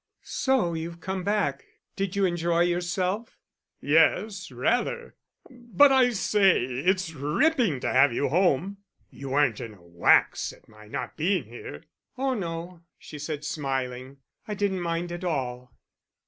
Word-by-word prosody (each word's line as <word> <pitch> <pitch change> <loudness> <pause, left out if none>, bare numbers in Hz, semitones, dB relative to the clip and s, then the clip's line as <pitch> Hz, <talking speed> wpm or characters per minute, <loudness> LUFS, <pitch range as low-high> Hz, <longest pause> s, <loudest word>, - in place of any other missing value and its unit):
"So 260 -11 0
you've 165 +1 -5
come 190 +1 -4
back? 205 +1 0 0.3
Did 195 0 -2
you 200 -1 +2
enjoy 170 -1 +1
yourself?" 180 +5 -1 0.4
"Yes, 180 +7 +2
rather. 245 - -1 0.3
But 250 +3 +3
I 260 -2 +5
say, 200 - +3
it's 165 +8 0
ripping 170 - +1
to - - -1
have 130 +1 +5
you 125 +4 0
home. 180 +3 +1 0.3
You 135 -1 -8
weren't 135 -5 +2
in 110 -2 -8
a 90 - -21
wax 85 0 +2
at - - -21
my 110 0 -16
not - - -5
being 175 0 +1
here?" 110 -10 -10 0.3
"Oh 265 0 0
no," 170 -4 -5 0.2
she 150 - -10
said, 150 0 -5
smiling. 135 -2 -3 0.3
"I 210 - -3
didn't 195 -2 -1
mind 170 0 -2
at 175 +1 -6
all." 125 -7 -3
170 Hz, 145 wpm, -26 LUFS, 140-200 Hz, 0.4 s, I